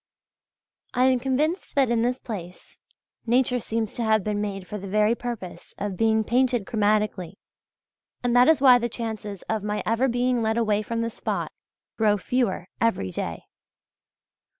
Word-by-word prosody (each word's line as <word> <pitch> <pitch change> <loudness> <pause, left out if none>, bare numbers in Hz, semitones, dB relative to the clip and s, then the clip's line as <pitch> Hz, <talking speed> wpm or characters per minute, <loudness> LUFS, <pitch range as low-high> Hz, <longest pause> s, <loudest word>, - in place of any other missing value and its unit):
I 250 - +4
am 260 -1 +3
convinced 295 +9 -1
that 270 -4 +3
in 235 -1 +2
this 245 +2 +1
place 185 -8 -9 0.5
nature 250 +1 +2
seems 225 -2 -2
to 240 - -3
have 220 -2 +2
been 205 0 -1
made 195 -2 -4
for 210 +3 -6
the 195 - -7
very 210 +3 +3
purpose 235 -6 -7
of 200 -2 -3
being 220 +2 +2
painted 245 -1 +1
chromatically, 210 -5 0 0.9
and 245 -1 +1
that 245 +1 +6
is 320 -4 +4
why 255 -3 +7
the 235 0 -2
chances 215 -4 -5
of 220 -1 -2
my 210 +1 -2
ever 230 +4 +2
being 245 0 +1
led 220 0 0
away 215 -3 +2
from 230 +2 -3
the 230 0 -2
spot, - - -3 0.5
grow 210 -2 +3
fewer 200 -5 -1
every 185 - +1
day. - - -4
225 Hz, 165 wpm, -25 LUFS, 210-245 Hz, 0.9 s, why